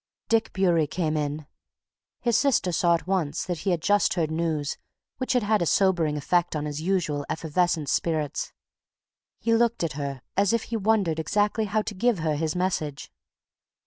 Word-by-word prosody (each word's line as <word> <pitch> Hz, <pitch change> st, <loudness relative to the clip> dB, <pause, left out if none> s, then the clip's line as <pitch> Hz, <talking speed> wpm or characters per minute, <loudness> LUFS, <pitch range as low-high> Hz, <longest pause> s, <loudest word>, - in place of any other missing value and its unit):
Dick 225 Hz, 0 st, +2 dB
Bewery 175 Hz, -5 st, +2 dB
came 160 Hz, -1 st, -1 dB
hurriedly 150 Hz, -1 st, 0 dB, 0.2 s
in. 145 Hz, -, -21 dB, 0.7 s
His 235 Hz, -2 st, +1 dB
sister 235 Hz, -8 st, +2 dB
saw 170 Hz, 0 st, +3 dB
at 165 Hz, -, -5 dB
once 185 Hz, -6 st, -1 dB
that 175 Hz, -3 st, -3 dB
he 195 Hz, -, -2 dB
had 170 Hz, -3 st, 0 dB
just 205 Hz, 0 st, +3 dB
heard 160 Hz, -3 st, 0 dB
news 160 Hz, -3 st, -1 dB, 0.4 s
which 255 Hz, -, 0 dB
had 250 Hz, -3 st, +2 dB
had 210 Hz, -1 st, +2 dB
a 170 Hz, -, +1 dB
sobering 170 Hz, -6 st, +2 dB
effect 175 Hz, +3 st, +1 dB
on 150 Hz, -1 st, -2 dB
his 150 Hz, 0 st, -4 dB
usually 160 Hz, -5 st, 0 dB
effervescent 160 Hz, -1 st, 0 dB
spirits. 155 Hz, -3 st, -1 dB, 0.9 s
He 230 Hz, +1 st, +1 dB
looked 235 Hz, -3 st, +2 dB
at 165 Hz, -, -1 dB
her 140 Hz, -2 st, -5 dB
as 200 Hz, +2 st, +3 dB
if 230 Hz, -, +1 dB
he 230 Hz, -, -5 dB
wondered 200 Hz, -6 st, +1 dB
exactly 210 Hz, +6 st, +1 dB
how 215 Hz, +1 st, 0 dB
to 210 Hz, -, -5 dB
give 235 Hz, +3 st, +1 dB
her 160 Hz, -2 st, 0 dB
his 155 Hz, +1 st, -1 dB
message. 175 Hz, -6 st, -2 dB
175 Hz, 180 wpm, -26 LUFS, 155-205 Hz, 0.9 s, saw